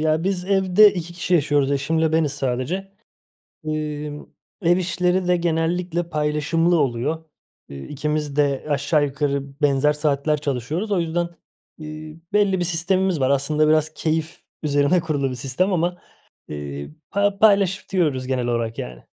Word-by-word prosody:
ya, 155 +2 +1
biz 190 -2 -1
evde 195 +1 +5
2 175 -1 -5
kişi 175 +1 -1
yaşıyoruz; 145 -3 +2
eşimle 160 +3 +1
beniz 160 -3 +2
sadece. 145 +9 -3 0.7
Emm, 150 -1 -4 0.4
ev 175 0 +3
işleri 180 0 0
de 180 0 +3
genellikle 170 +1 -1
paylaşımlı 155 +2 +1
oluyor. 145 +4 -1 0.4
Eee, 70 0 -8
ikimiz 150 0 -3
de 140 -2 +1
aşağı 145 +1 +2
yukarı 140 0 -3
benzer 145 +1 +3
saatler 150 0 0
çalışıyoruz. 150 - -2
O 195 - +2
yüzden, 170 +1 -1 0.5
eee, 155 0 -8 0.2
belli 200 -3 +3
bir - - +1
sistemimiz 180 +1 +1
var. 130 -1 +2
Aslında 150 +3 +2
biraz 155 0 +2
keyif 160 +1 -2 0.2
üzerine 145 +4 +3
kurulu 145 -5 -1
bir 130 - -5
sistem 135 +10 0
ama, 175 +1 0 0.5
eee, 70 -1 -6 0.2
pa 200 0 +1
paylaşıyoruz 190 -9 +2
genel 125 -2 -1
olarak 115 -1 -1
yani. 60 -1 -7
155 Hz, 140 wpm, -22 LUFS, 140-175 Hz, 0.7 s, evde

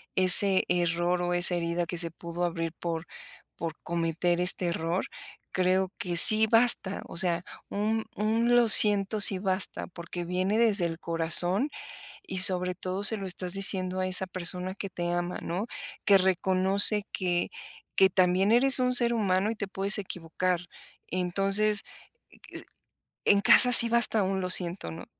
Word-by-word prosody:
ese 185 +1 +5
error 175 0 -3
o 175 0 -4
esa 175 0 +5
herida, 170 0 -4
que 175 - -8
se 165 -1 -5
pudo 170 +1 -9
abrir, 165 -1 -5
por 165 -1 -7 0.5
por 165 -2 -8
cometer 170 +1 -4
este 180 0 -1
error, 170 +1 -5 0.5
creo 185 0 -2
que 175 -2 -5
sí 215 +5 +8
basta. 225 -4 -1
O - - -11
sea, 175 -1 0 0.3
un 220 +2 -4
un: 225 +3 -2
"Lo 240 -1 +1
siento", 205 0 +6
sí 195 -1 +6
basta. 190 0 -4
Porque 175 0 -10
viene 185 +4 -4
desde 210 -6 -1
el 165 0 -7
corazón, 175 - +2 0.5
y 190 - -5
sobre 180 0 +5
todo, 185 +2 -7
se 220 +1 +1
lo 195 - -9
estás 180 0 -3
diciendo 185 -1 -2
a 185 - -4
esa 185 0 +1
persona 185 +1 -7
que 195 0 -9
te 175 -1 -6
ama, 175 +1 -6
¿no? 180 +5 -6 0.4
Que 200 -2 +3
reconoce 190 +2 +2
que 175 -2 -4 0.5
que 190 0 +2
también 185 +2 -1
eres 260 +3 +3
un 250 0 -2
ser 240 -1 +4
humano, 200 -2 -2
y - - -8
te 200 -2 -7
puedes 195 +2 0
equivocar. 180 -1 -6 0.5
Entonces 195 +4 -1 1.4
en 200 - +2
casa, 245 +4 +4
sí 235 0 +9
basta 235 -2 +1
un: 190 0 -4
"Lo 180 - -6
siento", 175 - -2
¿no? 80 - -12
185 Hz, 160 wpm, -25 LUFS, 175-200 Hz, 1.4 s, sí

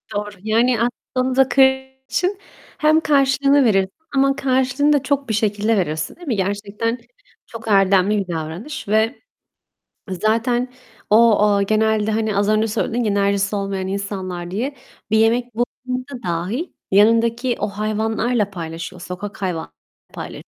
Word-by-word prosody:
Doğru. 205 0 -2
Yani 230 +3 +2 0.4
aslında 255 +1 +2
kır 270 - +5 0.5
için 380 +2 0 0.4
hem 310 +1 +4
karşılığını 275 -1 +3
verirsin 195 -4 +2 0.2
ama 275 0 +3
karşılığını 265 +2 +2
da 285 -2 +2
çok 275 -1 -1
bir - - 0
şekilde 210 +1 +1
verirsin, 155 -3 -2
değil 350 -3 -13
mi? 235 - 0
Gerçekten 205 +4 -2 0.5
çok 230 -1 -10
erdemli 195 0 +4
bir 195 -2 -2
davranış 165 - -6
ve, 220 +2 +1 0.9
eee, - - -2
zaten 240 +3 +1 0.4
o 225 0 +6
aaa, 205 -1 +3
genelde, 215 +1 +1
hani, 215 -1 0
az 200 0 +1
önce 215 +1 +2
söyledin 235 +2 -1
ya 210 - +1
enerjisi 200 0 +1
olmayan 195 -1 -3
insanlar 190 -3 -4
diye, 250 +9 -3 0.3
bir 220 - +3
yemek 235 +2 +2
bulduğunda 255 +2 -4
dahi 180 - -2 0.2
yanındaki 230 +4 +3
o 210 - -1
hayvanlarla 215 +1 -1
paylaşıyor. 170 0 -7
Sokak 200 +3 -7
hayvanlarıyla 175 - -3 0.4
paylaşıyor - - -7
220 Hz, 140 wpm, -20 LUFS, 200-250 Hz, 0.9 s, o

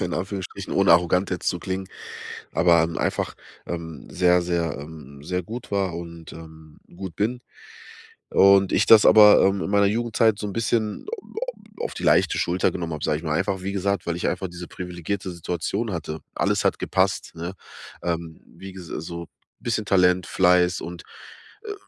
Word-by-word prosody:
in 90 -2 -2
Anführungsstrichen 95 0 -5
ohne 95 -3 +5
arrogant 90 +3 +3
jetzt 90 - -1
zu 90 - -1
klingen, 95 +1 -4 0.6
aber, 85 -1 +4
hm, 85 +1 -2
einfach, - - -1 0.3
ähm, 85 -2 -6
sehr, 90 -1 +3
sehr, 85 -4 -1
ähm, 70 -2 -11
sehr 90 +1 -2
gut 115 +7 -8
war 95 -3 0
und, 85 -1 -8
ähm, 80 -1 -13 0.2
gut 95 -3 -7
bin. 120 +4 -1 0.9
Und 100 0 +5
ich - - +3
das 110 -2 +8
aber, 105 -1 +8
ähm, 95 0 +2
in - - -3
meiner 100 0 +4
Jugendzeit 110 0 +2
so 105 - -3
'n 100 - -5
bisschen 110 -1 -1
au 460 -3 -7
au - - -7
au - - 0
auf - - -4
die - - -7
leichte - - +3
Schulter 90 +1 +1
genommen 85 -2 -4
hab, 75 - -6
sage 75 - +1
ich 80 - -10
mal, 75 -1 -1
einfach 95 0 -1
wie 100 +1 -3
gesagt, 100 0 -1
weil 85 -1 -1
ich 85 - -2
einfach 95 +1 -3
diese 90 0 -9
privilegierte 90 +2 -5
Situation 90 +6 -3
hatte. 80 -2 -4
Alles - - 0
hat - - +1
gepasst, 95 -1 0
ne? 85 +3 -5 0.5
Ähm, 85 -2 -3 0.2
wie 95 0 -9
gesa 90 -5 -7
so 85 +1 -7 0.3
bisschen 115 -2 -1
Talent, 90 -2 +3
Fleiß 90 -1 +3
und, 85 +1 -7 0.6
äh, 415 - -4
90 Hz, 185 wpm, -24 LUFS, 85-100 Hz, 0.9 s, das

